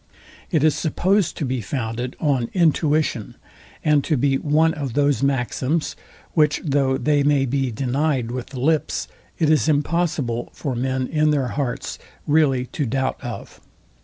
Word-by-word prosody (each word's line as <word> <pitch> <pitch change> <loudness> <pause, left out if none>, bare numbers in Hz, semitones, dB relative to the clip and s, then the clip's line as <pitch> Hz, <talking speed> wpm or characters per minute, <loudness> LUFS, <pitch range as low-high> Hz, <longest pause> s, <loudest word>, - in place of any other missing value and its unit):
It 160 -5 +1
is 155 -1 +5
supposed 190 +4 +1
to 150 - -2
be 130 -1 -2
founded 120 +2 -3
on 135 -6 +1
intuition, 155 - +1 0.5
and 150 -2 +4
to 155 - +1
be 135 +1 +2
one 160 +2 +2
of 140 -5 -4
those 145 0 +2
maxims, 140 +3 0 0.4
which 150 -2 +3
though 135 -2 +2
they 145 -1 +2
may 140 -1 +3
be 135 0 0
denyed 130 +1 -1
with 125 0 -4
the 130 -1 -8
lips, 155 +4 0 0.3
it 160 - +2
is 155 0 +3
impossible 145 -5 0
for 135 -5 -4
men 130 +1 -1
in 155 +2 +1
their 140 -4 +1
hearts 135 -3 -3 0.3
really 145 -4 +3
to 140 +2 -3
doubt 130 +2 -1
of. - - -7
140 Hz, 155 wpm, -22 LUFS, 130-155 Hz, 0.5 s, is